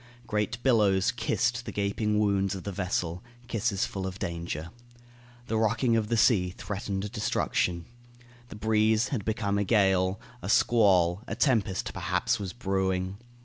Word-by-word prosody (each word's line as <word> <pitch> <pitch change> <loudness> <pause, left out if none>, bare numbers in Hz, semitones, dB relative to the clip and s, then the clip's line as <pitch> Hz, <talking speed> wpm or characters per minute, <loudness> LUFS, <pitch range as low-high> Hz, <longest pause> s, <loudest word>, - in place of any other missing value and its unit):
Great 105 +2 -1
billows 105 -5 +3
kissed 120 0 -1
the 115 - -6
gaping 105 +1 0
wounds 100 -2 +1
of 95 - -7
the 100 - -4
vessel 90 -1 -2 0.2
kisses 110 -3 0
full 95 -1 -4
of 95 0 -6
danger. 85 -2 -4 0.7
The 110 -2 -1
rocking 115 +2 +2
of 110 -2 +1
the 115 +1 0
sea 100 -6 +4
threatened 100 +1 -4
destruction. 90 -6 -1 0.6
The - - -10
breeze 110 +1 +2
had 120 -8 -2
become 100 -2 -1
a - - +2
gale. 95 -2 +2 0.2
A - - -5
squall, 95 -6 +4
a - - -3
tempest, 110 -9 +1
perhaps, 95 +6 0
was 95 -3 -4
brewing. 95 -3 -1
100 Hz, 145 wpm, -28 LUFS, 95-110 Hz, 0.7 s, sea